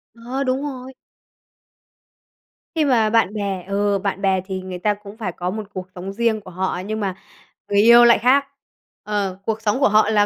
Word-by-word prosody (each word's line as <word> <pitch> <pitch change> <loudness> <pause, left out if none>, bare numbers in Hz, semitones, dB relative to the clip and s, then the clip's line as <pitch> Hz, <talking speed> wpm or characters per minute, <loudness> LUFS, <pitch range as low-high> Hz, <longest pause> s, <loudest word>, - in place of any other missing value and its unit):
Ờ, 245 +4 -4
đúng 260 0 0
rồi! 265 -2 -6 1.8
Khi 315 -2 +2
mà 230 -6 +3
bạn 220 -3 +2
bè 200 -3 -3
ừ, 200 0 0
bạn 195 0 -3
bè 190 -1 +2
thì 190 -1 -4
người 185 -1 -7
ta 210 +3 +1
cũng 205 0 -12
phải 210 -6 -3
có 180 +1 -4
một 215 +2 -4
cuộc 185 -1 -6
sống 185 +2 -6
riêng 225 0 0
của 185 - -12
họ 185 0 -2
nhưng 215 +1 -3
mà 195 -3 -2 0.5
người 200 - +2
yêu 235 +2 +8
lại 235 - +6
khác. 265 +5 +4 0.6
Ờ, 200 -3 -2
cuộc 220 0 -2
sống 215 +3 0
của 275 - +4
họ 215 +1 +4
là 210 -1 +3
210 Hz, 200 wpm, -21 LUFS, 195-235 Hz, 1.8 s, yêu